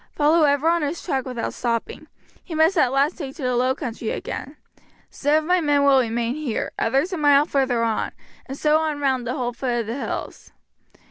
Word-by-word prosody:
Follow 310 +2 +4
ever 285 +2 +2
on 340 0 +3
his 300 +3 -3
track 265 -7 -1
without 245 -3 -4
stopping; 230 -2 -3 0.4
he 335 - -7
must 320 +4 +3
at 280 -7 +3
last 280 +6 +1
take 275 -4 -6
to 295 - -8
the 250 -1 0
low 255 +2 +2
country 235 -6 -5
again. 285 +3 -5 0.5
Some 290 +2 +1
of 310 - +2
my 360 +2 +2
men 290 -2 +2
shall 280 -1 +5
remain 235 0 -1
here, 285 -6 -3
others 275 - +1
a - - -2
mile 290 -1 +5
further 260 -6 0
on, 225 -1 -1 0.4
and 270 +1 -6
so 305 +1 +3
on 310 -2 -2
round 260 -4 0
the 250 - -2
whole 245 -3 -2
foot 240 -1 -1
of - - -6
the 225 - -4
hills. - - -6
275 Hz, 210 wpm, -22 LUFS, 245-305 Hz, 0.5 s, shall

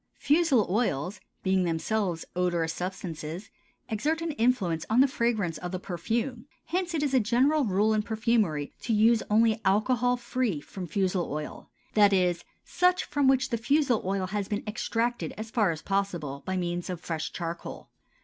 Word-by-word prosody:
Fusel 290 - +3
oils, 190 - -1 0.2
being 190 0 +2
themselves 175 +1 -1
odorous 175 -2 0
substances, 175 -1 -5 0.4
exert 295 +10 0
an 330 - -1
influence 225 - +1
on 225 +3 +3
the 270 - +7
fragrance 220 - -1
of 180 - -5
the 185 - -2
perfume; 230 - -3 0.2
hence 355 0 -2
it 300 - 0
is 280 -2 0
a 260 - +5
general 255 +7 +3
rule 210 +2 +2
in 215 - +2
perfumery 215 -9 0
to 230 - -1
use 220 +2 +4
only 220 +1 +3
alcohol 245 +5 +2
free 240 - -1
from 180 +5 -8
fusel 185 +1 0
oil; 150 +1 -6 0.2
that 205 -2 +5
is, 180 -2 +2 0.2
such 360 +1 +2
from 285 -2 0
which 260 -1 +3
the 235 - +1
fusel 260 0 +2
oil 190 0 -1
has 200 +1 -3
been 205 - -2
extracted 230 +2 -2
as 220 +1 -6
far 220 -6 +2
as 160 -2 -4
possible 175 -8 -2
by 190 0 -1
means 175 0 -2
of 180 -2 -4
fresh 160 -2 -4
charcoal. 170 -1 -6
210 Hz, 170 wpm, -28 LUFS, 180-240 Hz, 0.4 s, the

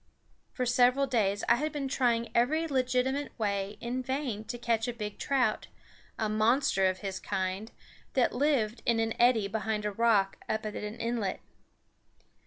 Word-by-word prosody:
For 250 - -2
several 250 +2 +4
days 210 -6 0
I 235 - +5
had 305 +4 -1
been 280 -2 -3
trying 240 -3 +1
every 310 +8 +2
legitimate 260 0 0
way 200 -2 -2
in 245 +2 -3
vain 260 -4 -3
to 240 - -5
catch 230 -1 0
a 245 - -2
big 210 -3 -6
trout, 255 -6 +1 0.5
a 220 - 0
monster 215 -1 +2
of 185 0 -2
his 195 -2 -4
kind, 190 +2 -3 0.4
that 255 -3 +2
lived 245 -5 +1
in 235 -1 +3
an 225 0 0
eddy 235 -4 +4
behind 215 0 -2
a 210 - 0
rock 205 -2 +2
up 220 0 -1
at 210 - -3
the 210 +1 -6
inlet. 230 -5 -2
235 Hz, 165 wpm, -30 LUFS, 210-255 Hz, 0.5 s, I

